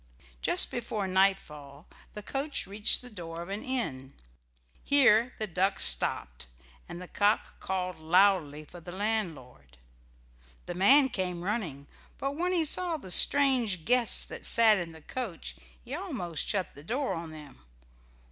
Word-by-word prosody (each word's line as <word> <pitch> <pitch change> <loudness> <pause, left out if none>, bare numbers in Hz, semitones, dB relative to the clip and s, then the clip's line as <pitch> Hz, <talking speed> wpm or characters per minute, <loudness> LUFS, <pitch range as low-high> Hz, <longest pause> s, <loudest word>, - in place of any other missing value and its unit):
Just - - +5
before 220 -4 -4
nightfall 170 -6 -1 0.3
the 210 - -8
coach 275 +6 -3
reached 205 +5 +2
the 250 - -9
door 170 -4 -8
of 175 - -12
an 200 +2 -5
inn. 140 - -4 0.7
Here 250 -4 +4
the 215 - -3
duck 190 +1 -1
stopped, - - -1 0.4
and 175 - -8
the 180 - -9
cock 205 +3 -1
called 185 -2 -4
loudly 160 -3 +2
for 175 - -13
the 175 +1 -11
landlord. 160 - -5 0.9
The - - -5
man 265 +10 +5
came 180 -5 -3
running, 180 - -4 0.3
but 275 - -3
when 355 +4 -1
he 340 -3 +1
saw 340 +2 0
the 190 -11 -8
strange 245 - +4
guests 245 -1 +3
that - - -8
sat 220 -3 +6
in 170 -2 -6
the 160 -1 -14
coach 185 - -6 0.3
he - - -9
almost 170 -3 -5
shut 195 -3 -3
the 145 - -14
door 260 - -2
on 165 0 -6
them. 150 - -13
190 Hz, 150 wpm, -28 LUFS, 160-230 Hz, 0.9 s, sat